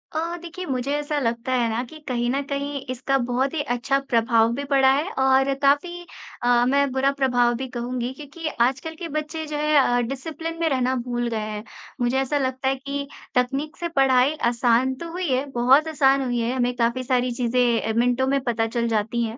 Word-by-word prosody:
अ, -, -, +1 dB, 0.2 s
देखिए 350 Hz, +2 st, -7 dB
मुझे 260 Hz, 0 st, -2 dB
ऐसा 295 Hz, +1 st, -1 dB
लगता 235 Hz, 0 st, -1 dB
है 240 Hz, -2 st, +2 dB
ना 225 Hz, +2 st, -1 dB
कि 310 Hz, -, -11 dB
कहीं 240 Hz, -1 st, 0 dB
न 275 Hz, +2 st, 0 dB
कहीं 280 Hz, 0 st, -3 dB
इसका 260 Hz, +2 st, 0 dB
बहुत 250 Hz, +3 st, -1 dB
ही 315 Hz, -, -1 dB
अच्छा 270 Hz, +3 st, 0 dB
प्रभाव 230 Hz, -1 st, +3 dB
भी 280 Hz, +3 st, -3 dB
पड़ा 270 Hz, -1 st, +5 dB
है 305 Hz, +8 st, -1 dB
और 265 Hz, +1 st, +3 dB
काफ़ी 345 Hz, +5 st, +1 dB, 0.4 s
अ, 245 Hz, 0 st, +4 dB
मैं 280 Hz, +2 st, +2 dB
बुरा 265 Hz, +1 st, +2 dB
प्रभाव 250 Hz, -3 st, +2 dB
भी 260 Hz, +2 st, -4 dB
कहूँगी, 245 Hz, 0 st, -3 dB
क्योंकि 300 Hz, +3 st, -7 dB
आजकल 265 Hz, +6 st, 0 dB
के 340 Hz, -, -4 dB
बच्चे 305 Hz, +2 st, -4 dB
जो 295 Hz, 0 st, -4 dB
हैं 300 Hz, 0 st, +2 dB
अ, 245 Hz, -2 st, +3 dB
डिसिप्लिन 325 Hz, +5 st, -5 dB
में 330 Hz, -, +1 dB
रहना 260 Hz, -2 st, +1 dB
भूल 240 Hz, -1 st, -2 dB
गए 225 Hz, -, -2 dB
हैं। 215 Hz, 0 st, -5 dB, 0.4 s
मुझे 245 Hz, +2 st, +1 dB
ऐसा 270 Hz, +2 st, 0 dB
लगता 260 Hz, -1 st, -1 dB
है 270 Hz, -, +1 dB
कि 280 Hz, +1 st, -5 dB, 0.3 s
तकनीक 270 Hz, +5 st, -1 dB
से 345 Hz, -, -2 dB
पढ़ाई 270 Hz, -2 st, +3 dB, 0.2 s
आसान 245 Hz, +2 st, +2 dB
तो 335 Hz, +5 st, -7 dB
हुई 360 Hz, +1 st, -3 dB
है, 260 Hz, +2 st, +1 dB
बहुत 265 Hz, +6 st, +4 dB
आसान 275 Hz, -3 st, +3 dB
हुई 245 Hz, -1 st, -1 dB
है, 235 Hz, +1 st, 0 dB
हमें 245 Hz, -1 st, +1 dB
काफ़ी 240 Hz, +1 st, 0 dB
सारी 250 Hz, -1 st, +1 dB
चीज़ें 240 Hz, -1 st, +1 dB
अ, 220 Hz, +1 st, -2 dB
मिनटों 245 Hz, +2 st, +2 dB
में 275 Hz, +1 st, +2 dB
पता 225 Hz, -3 st, 0 dB
चल 235 Hz, +1 st, -1 dB
जाती 225 Hz, +2 st, 0 dB
हैं। 225 Hz, +2 st, -4 dB
260 Hz, 210 wpm, -23 LUFS, 240-280 Hz, 0.4 s, पड़ा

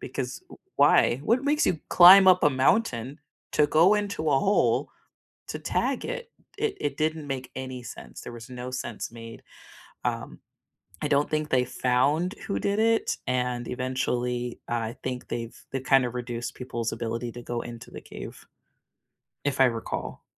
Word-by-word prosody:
because 130 Hz, -1 st, -4 dB
w -, -, -13 dB, 0.2 s
why? 120 Hz, -, +5 dB
What 240 Hz, +4 st, +2 dB
makes 295 Hz, +1 st, +2 dB
you 160 Hz, -, 0 dB
climb 190 Hz, +2 st, +9 dB
up 180 Hz, -1 st, +6 dB
a 150 Hz, -, +5 dB
mountain 130 Hz, -, +1 dB, 0.3 s
to 150 Hz, -, +4 dB
go 165 Hz, +7 st, +5 dB
into 200 Hz, -7 st, -1 dB
a 135 Hz, -, +4 dB
hole 195 Hz, +8 st, +2 dB, 0.6 s
to -, -, -4 dB
tag -, -, -1 dB
it? 475 Hz, -1 st, -5 dB, 0.3 s
It 435 Hz, -1 st, -1 dB
it 145 Hz, -2 st, -2 dB
didn't 155 Hz, -1 st, -1 dB
make 130 Hz, -2 st, -5 dB
any 130 Hz, -1 st, -5 dB
sense, 85 Hz, -, -10 dB
there -, -, -8 dB
was 115 Hz, 0 st, -10 dB
no 125 Hz, 0 st, -6 dB
sense 120 Hz, -3 st, -5 dB
made. 115 Hz, -1 st, -10 dB, 0.6 s
Um, -, -, -3 dB, 0.6 s
I -, -, 0 dB
don't 145 Hz, 0 st, +2 dB
think 155 Hz, -1 st, -1 dB
they 125 Hz, -1 st, +3 dB
found 135 Hz, -, +1 dB
who 200 Hz, -, -1 dB
did 200 Hz, +1 st, 0 dB
it, 225 Hz, +1 st, +2 dB
and 125 Hz, -1 st, -1 dB
eventually, 125 Hz, -1 st, -2 dB
I 115 Hz, -1 st, -2 dB
think 125 Hz, -1 st, -4 dB
they've 115 Hz, -1 st, -5 dB, 0.2 s
they've 135 Hz, -1 st, -2 dB
kind 135 Hz, -1 st, +4 dB
of 120 Hz, -, -6 dB
reduced 120 Hz, -1 st, -4 dB
people's 120 Hz, -3 st, -4 dB
ability 115 Hz, +1 st, -3 dB
to 120 Hz, -, -9 dB
go 120 Hz, 0 st, -3 dB
into 120 Hz, -1 st, -9 dB
the -, -, -9 dB
cave, -, -, -10 dB, 1.0 s
if 140 Hz, -2 st, -1 dB
I -, -, +8 dB
recall. 115 Hz, -2 st, -4 dB
130 Hz, 170 wpm, -26 LUFS, 120-155 Hz, 1.0 s, climb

